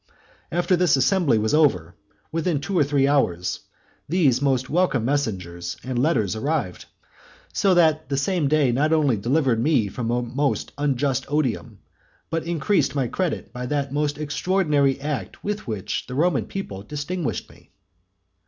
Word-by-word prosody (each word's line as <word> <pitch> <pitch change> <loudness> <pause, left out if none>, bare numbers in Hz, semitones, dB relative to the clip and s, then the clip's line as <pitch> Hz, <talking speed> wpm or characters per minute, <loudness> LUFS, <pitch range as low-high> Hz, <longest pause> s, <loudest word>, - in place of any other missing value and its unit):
After 175 +2 +2
this 175 -5 +3
assembly 135 -1 +3
was 110 0 0
over, 115 - +2 0.4
within 165 -1 0
two 175 +7 -4
or 165 - +5
three 140 -1 +2
hours, 90 -11 +1 0.5
these 145 -7 +3
most 130 -2 +1
welcome 155 -8 +1
messengers 90 -10 -2
and 125 -1 -2
letters 115 - +1
arrived; 135 - -2 0.7
so 195 -2 +3
that 155 -3 +3
the 140 - 0
same 155 +2 +1
day 145 -3 +3
not 150 +6 +2
only 145 -6 +3
delivered 120 +2 +1
me 125 -7 +2
from 115 +3 -4
a 120 +1 0
most 140 +4 -1
unjust 140 -2 0
odium, 145 -6 -2 0.5
but 165 -1 -1
increased 170 +1 +1
my 135 -3 +1
credit 180 +5 -3
by 125 0 -5
that 140 -1 -2
most 145 0 0
extraordinary 150 -3 +1
act 145 -1 -5
with 210 -3 -3
which 105 -3 -3
the 125 - -6
Roman 160 -1 +1
people 100 - -6
distinguished 145 - -4
me. - - -21
140 Hz, 155 wpm, -23 LUFS, 120-160 Hz, 0.7 s, or